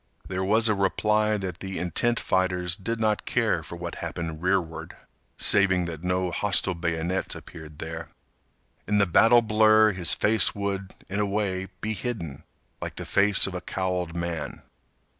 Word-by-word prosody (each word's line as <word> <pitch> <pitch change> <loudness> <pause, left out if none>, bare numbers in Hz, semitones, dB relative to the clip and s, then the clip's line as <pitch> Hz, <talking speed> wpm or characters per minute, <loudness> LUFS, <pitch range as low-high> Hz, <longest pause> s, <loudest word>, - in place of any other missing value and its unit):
There 95 0 -3
was 110 +4 +3
a 110 - +3
reply 105 +2 +1
that 90 -3 -5
the 95 -1 -6
intent 120 +6 0
fighters 90 -1 0
did 115 +3 -4
not 110 -1 0
care - - +1
for - - -8
what 85 0 -6
happened 80 -2 -5
rearward 90 -3 -2 0.4
saving 95 -3 +4
that 85 -1 -7
no 90 0 0
hostile 100 0 +2
bayonets 85 +2 -2
appeared 80 -2 -11
there. 80 +1 -6 0.8
In 105 - +2
the 100 - +4
battle 115 +7 +5
blur 110 0 +5
his 90 -3 +2
face 105 -2 +4
would, 100 -1 -3 0.2
in 100 +2 -3
a 105 - +1
way, 100 -2 -2
be 110 +1 -2
hidden, 100 - -5 0.4
like - - -5
the - - -6
face 100 0 +4
of 95 - -4
a 90 - -4
cowled 90 -3 -3
man. 85 -4 -4
95 Hz, 160 wpm, -26 LUFS, 85-105 Hz, 0.8 s, battle